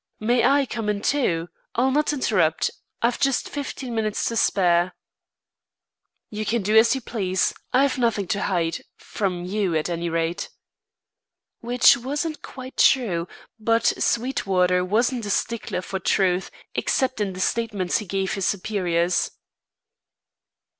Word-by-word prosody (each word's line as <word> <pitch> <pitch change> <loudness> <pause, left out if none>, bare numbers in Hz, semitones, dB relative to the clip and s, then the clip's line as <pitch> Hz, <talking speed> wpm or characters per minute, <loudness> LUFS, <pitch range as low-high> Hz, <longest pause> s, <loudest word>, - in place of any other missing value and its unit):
"May 235 +2 +2
I 280 0 +4
come 225 -4 -4
in, 205 -1 -1
too? 175 - +1 0.3
I'll 255 +3 +2
not 300 +3 +2
interrupt. 190 - +1 0.3
I've 235 +1 +1
just 275 -2 +1
fifteen 275 -3 -5
minutes 215 -2 -1
to 230 - -4
spare." 180 -4 +2 1.4
"You 215 0 -3
can 225 0 0
do 210 +3 +1
as 225 +3 +6
you 265 - -4
please. 190 -6 -1 0.2
I've 265 +1 +2
nothing 230 -5 +1
to 200 - 0
hide 170 -4 -1 0.2
from 180 -4 -3
you, 190 -2 -1
at 155 +2 0
any 170 0 -2
rate." 165 +1 -2 1.1
Which 245 +1 +5
wasn't 290 +6 -3
quite 260 0 -10
true; 185 -10 +3 0.3
but 230 +1 +2
Sweetwater 190 -7 +1
wasn't 230 +4 0
a - - -4
stickler 210 -2 -2
for 190 +1 -4
truth, 185 0 +1 0.2
except 260 -4 0
in 195 -2 -1
the 185 - -8
statements 205 -3 0
he 210 - -8
gave 195 +1 -1
his 195 -3 -1
superiors. 180 -3 0
210 Hz, 140 wpm, -23 LUFS, 180-245 Hz, 1.4 s, as